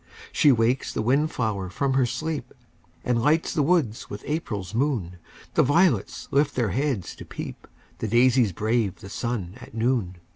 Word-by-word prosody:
She 145 - +5
wakes 120 +1 +1
the - - -2
wind 140 +7 +2
flower 100 -6 -2
from 135 +7 0
her 130 -2 +3
sleep, 150 +4 -4 0.5
And 120 -2 +1
lights 155 +6 +2
the 155 - +1
woods 145 -8 +1
with 100 - -7
April's 110 - -3
moon; 110 - -1 0.3
The - - +4
violets 170 +6 +2
lift 145 +1 +2
their 120 -4 +1
heads 130 -5 -1
to - - -8
peep, - - -8 0.3
The 110 - -2
daisies 120 0 +4
brave 110 +1 -1
the 95 - -9
sun 105 -5 -3
at 120 - -12
noon. 115 -6 0
120 Hz, 170 wpm, -25 LUFS, 105-140 Hz, 0.5 s, She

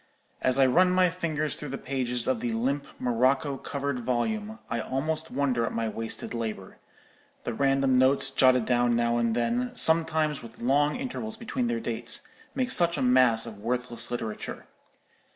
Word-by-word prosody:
As 130 0 +3
I 135 - +5
run 180 +8 +4
my 180 -1 +3
fingers 155 -4 -2
through 150 - -7
the 135 - -4
pages 125 -3 -2
of 130 -3 0
the 120 -1 -2
limp 135 +5 -1
morocco 130 +4 +1
covered 140 0 -4
volume, 210 - -2
I 115 - -2
almost 155 +6 -2
wonder 130 -4 0
at - - -3
my 115 -1 -1
wasted 115 +3 -3
labour;—the 115 +1 -8
random 135 0 +2
notes, 135 +1 +5
jotted 130 -3 +4
down 120 -1 +2
now 120 0 +1
and 115 -1 0
then, 245 - -1
sometimes 160 - +2
with 115 -1 -12
long 145 +4 +2
intervals 235 -4 -5
between 240 +2 -3
their 235 -1 -1
dates, 230 - -1 0.3
make 255 -1 0
such 170 -5 +3
a - - -2
mass 125 -3 +4
of 110 -3 -9
worthless 120 +2 -3
literature. 115 -3 -5
130 Hz, 165 wpm, -27 LUFS, 120-160 Hz, 0.3 s, I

